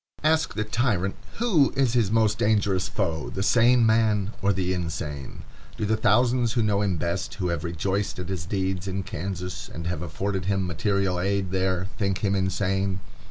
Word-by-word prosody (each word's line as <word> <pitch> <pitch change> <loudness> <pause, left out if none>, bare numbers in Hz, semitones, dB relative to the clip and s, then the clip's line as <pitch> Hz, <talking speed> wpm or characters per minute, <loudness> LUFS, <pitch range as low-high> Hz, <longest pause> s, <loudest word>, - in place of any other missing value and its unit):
Ask 160 +1 +2
the 110 - 0
tyrant 105 -4 0 0.2
who 195 - +3
is 135 -4 +2
his 115 -6 +2
most 110 -1 +2
dangerous 100 -4 +2
foe, 85 -6 -2
the 95 - -3
sane 120 +2 +5
man 110 -2 +2
or 100 - +3
the 95 -1 0
insane? 75 -5 -5 0.3
Do 110 - -1
the 110 +2 +2
thousands 120 +2 +3
who 120 -2 +2
know 105 -1 +2
him 95 -4 0
best, 85 +1 -2
who 90 - -2
have 85 -3 -2
rejoiced 95 +4 -2
at 90 0 -5
his 85 -4 -4
deeds 95 -1 -2
in 95 0 -2
Kansas, 90 +1 -5
and 85 - -7
have 85 -2 -2
afforded 95 +3 -3
him 95 -1 +1
material 95 +1 0
aid 95 0 0
there, 95 -1 0
think 100 -1 -1
him 100 - +2
insane? 95 0 0
95 Hz, 180 wpm, -25 LUFS, 90-110 Hz, 0.3 s, sane